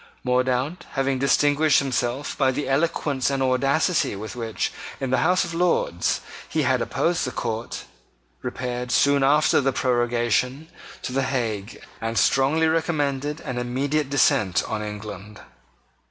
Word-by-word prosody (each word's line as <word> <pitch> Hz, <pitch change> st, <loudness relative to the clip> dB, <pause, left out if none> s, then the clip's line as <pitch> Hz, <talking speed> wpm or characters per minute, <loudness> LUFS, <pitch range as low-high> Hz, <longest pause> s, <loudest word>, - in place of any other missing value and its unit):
Mordaunt, 130 Hz, +5 st, 0 dB
having 135 Hz, -1 st, 0 dB
distinguished 145 Hz, +2 st, +3 dB
himself 130 Hz, +1 st, -1 dB
by 135 Hz, -2 st, +2 dB
the 135 Hz, +3 st, -2 dB
eloquence 140 Hz, -2 st, 0 dB
and 135 Hz, -1 st, 0 dB
audacity 135 Hz, -, +1 dB
with 110 Hz, +4 st, -7 dB
which, 115 Hz, -2 st, -3 dB, 0.3 s
in 135 Hz, -2 st, -3 dB
the 130 Hz, -, +3 dB
House 180 Hz, +6 st, +3 dB
of 170 Hz, -, -6 dB
Lords, 165 Hz, -, +1 dB, 0.3 s
he -, -, 0 dB
had -, -, +2 dB
opposed 175 Hz, +1 st, 0 dB
the -, -, -1 dB
court, 115 Hz, -1 st, -4 dB, 0.6 s
repaired, 125 Hz, -1 st, -4 dB
soon 140 Hz, +3 st, +4 dB
after 150 Hz, +2 st, +4 dB
the 135 Hz, 0 st, +1 dB
prorogation, 125 Hz, +3 st, 0 dB, 0.3 s
to 125 Hz, -, -4 dB
the 135 Hz, -, +1 dB
Hague, 115 Hz, -6 st, -3 dB, 0.2 s
and 115 Hz, 0 st, -2 dB
strongly 135 Hz, +9 st, +3 dB
recommended 150 Hz, -3 st, -1 dB
an 125 Hz, -1 st, -4 dB
immediate 135 Hz, +4 st, -1 dB
descent 135 Hz, -, +2 dB
on 110 Hz, -1 st, -3 dB
England. 105 Hz, -1 st, -7 dB
130 Hz, 140 wpm, -24 LUFS, 120-145 Hz, 0.6 s, soon